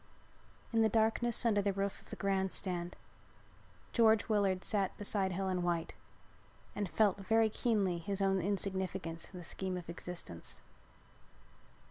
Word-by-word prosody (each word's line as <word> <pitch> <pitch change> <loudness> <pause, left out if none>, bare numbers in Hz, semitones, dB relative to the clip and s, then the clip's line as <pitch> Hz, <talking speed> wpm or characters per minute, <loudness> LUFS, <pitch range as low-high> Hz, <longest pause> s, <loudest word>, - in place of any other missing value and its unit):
In 225 - +4
the 220 - +5
darkness 225 +2 +2
under 210 -3 +4
the 200 0 +1
roof 195 0 -2
of - - -19
the - - -5
grand 190 -1 0
stand, 175 -2 -2 1.0
George 220 -2 +5
Willard 200 -4 +2
sat 200 -3 -1
beside 200 -2 0
Helen 185 0 -1
White 170 -1 -1 0.8
and 205 -3 -2
felt 205 -1 +3
very 220 +3 +3
keenly 200 -7 +1
his 195 +4 -3
own 195 -1 +2
insignificance 190 -3 -2
in 185 - -9
the 175 - -7
scheme 185 +2 -3
of 175 - -7
existence. 170 - -7
195 Hz, 140 wpm, -34 LUFS, 180-210 Hz, 1.0 s, the